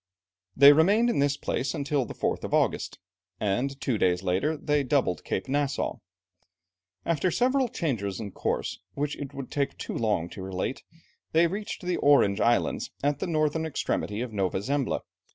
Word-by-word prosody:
They 140 +2 +10
remained 205 +10 +4
in - - 0
this 140 0 +2
place 135 +6 -2
until 140 -3 0
the - - -8
4th - - -1
of - - 0
August, - - 0 0.4
and 125 +7 -1
two 120 -6 -1
days 90 0 +2
later 95 - 0
they 150 0 +1
doubled 130 -9 +1
Cape 95 - -3
Nassau. 140 0 -1 1.1
After 170 +2 +1
several 255 +7 +2
changes 120 - -2
of 105 -4 -6
course, - - -2 0.2
which 145 +1 -2
it 140 -2 -7
would 135 -2 -7
take 140 -1 -1
too - - -5
long 105 -7 0
to 95 - -9
relate, 95 +6 -3 0.5
they 165 +2 +5
reached 200 +3 -4
the 180 -1 0
Orange 125 -8 +4
Islands 120 0 +1
at 145 0 +1
the - - -2
northern 155 -1 +1
extremity 110 -7 -2
of 125 -3 -5
Nova 95 -1 -1
Zembla. 140 +2 0
140 Hz, 170 wpm, -27 LUFS, 105-155 Hz, 1.1 s, They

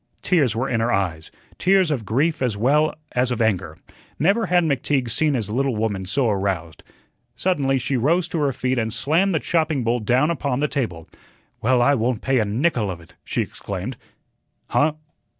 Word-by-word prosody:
Tears 145 - +2
were 130 +4 -1
in 120 -4 0
her 115 +2 +1
eyes, 85 -6 -1 0.3
tears 190 -3 +3
of 125 -7 -2
grief 145 - +1
as 120 -6 0
well 145 +8 +2 0.2
as 125 +1 +1
of 125 - -2
anger. 95 -8 0 0.4
Never 200 +9 +2
had 180 -1 +3
McTeague 140 -4 0
seen 150 +3 +1
his 110 -4 -2
little 130 +1 0
woman 105 -3 -2
so 125 +7 +1
aroused. 95 -6 -2 0.5
Suddenly 135 -3 +1
she 130 +1 -1
rose 165 +8 +2
to 165 - -2
her 145 -2 +1
feet 130 0 -1
and 110 -1 -1
slammed 160 - +1
the - - +2
chopping 155 -6 0
bowl 120 +2 +1
down 125 +8 +2
upon 140 -5 -1
the 150 - +1
table. 100 - -3 0.5
"Well, 125 +1 +3
I 140 - +4
won't 120 -2 -1
pay 135 0 +2
a 110 - +1
nickel 115 0 0
of 90 -2 -5
it," 85 - -18
she - - -1
exclaimed. - - -6 0.7
"Huh? 150 +1 +2
130 Hz, 185 wpm, -22 LUFS, 110-150 Hz, 0.7 s, I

